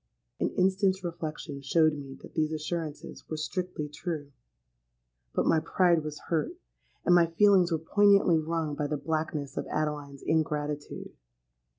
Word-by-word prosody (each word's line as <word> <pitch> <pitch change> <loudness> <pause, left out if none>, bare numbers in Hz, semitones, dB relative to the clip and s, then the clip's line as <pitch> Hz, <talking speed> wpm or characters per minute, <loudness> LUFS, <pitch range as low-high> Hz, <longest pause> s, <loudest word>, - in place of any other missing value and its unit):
'—An - - +1
instant's 190 0 +2
reflection 155 -4 -5
showed 155 +3 +3
me 140 -2 -7
that - - -11
these 155 -1 +1
assurances 155 0 -4
were 155 - -3
strictly 175 -1 -3
true. 150 -1 -5 1.0
But - - +2
my 160 - +4
pride 170 0 +2
was 150 -1 -6
hurt, 165 - -1 0.5
and 175 - +5
my 175 -1 +6
feelings 185 +1 +4
were 165 - +2
poignantly 195 0 +4
wrung 160 -1 -2
by 145 0 -2
the 150 - -1
blackness 155 -2 -3
of - - -2
Adeline's 145 -2 -3
ingratitude. 150 -2 -1
155 Hz, 145 wpm, -29 LUFS, 150-175 Hz, 1.0 s, my